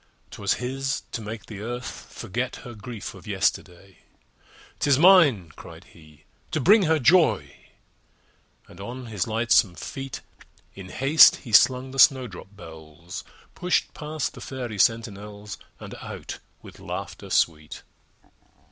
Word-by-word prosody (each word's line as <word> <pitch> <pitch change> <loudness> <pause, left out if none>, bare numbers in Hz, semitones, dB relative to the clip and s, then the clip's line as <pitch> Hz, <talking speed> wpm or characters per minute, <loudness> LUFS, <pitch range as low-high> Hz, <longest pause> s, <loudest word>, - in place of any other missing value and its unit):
'Twas - - -1
his 135 +2 -3
to 115 - -4
make 110 +1 -7
the 105 -3 -9
Earth 120 +3 -6
forget 120 +4 -4
Her 120 - -8
grief 110 0 -8
of - - -14
yesterday. 95 -2 -2 0.8
"'Tis 140 -2 +3
mine," 150 - +5
cried - - -12
he, 75 -2 -19 0.3
"to 155 - -1
bring 200 - +5
her 160 0 +3
joy!" 160 +4 +3 1.1
And - - -13
on 125 +5 -7
his 105 -6 -3
lightsome 110 -4 +2
feet 135 +6 -7 0.5
In 95 -1 -10
haste 140 - +6
he 115 - -8
slung 130 +4 +4
the 135 - -6
snowdrop 120 -7 +3
bells, 80 -1 -10 0.3
Pushed 180 0 -1
past 150 -1 -4
the - - -12
Fairy 120 -6 -6
sentinels, 105 -2 -1 0.2
And - - -9
out - - -8 0.2
with - - -13
laughter - - -7
sweet. 75 -2 -1
115 Hz, 130 wpm, -25 LUFS, 100-135 Hz, 1.1 s, haste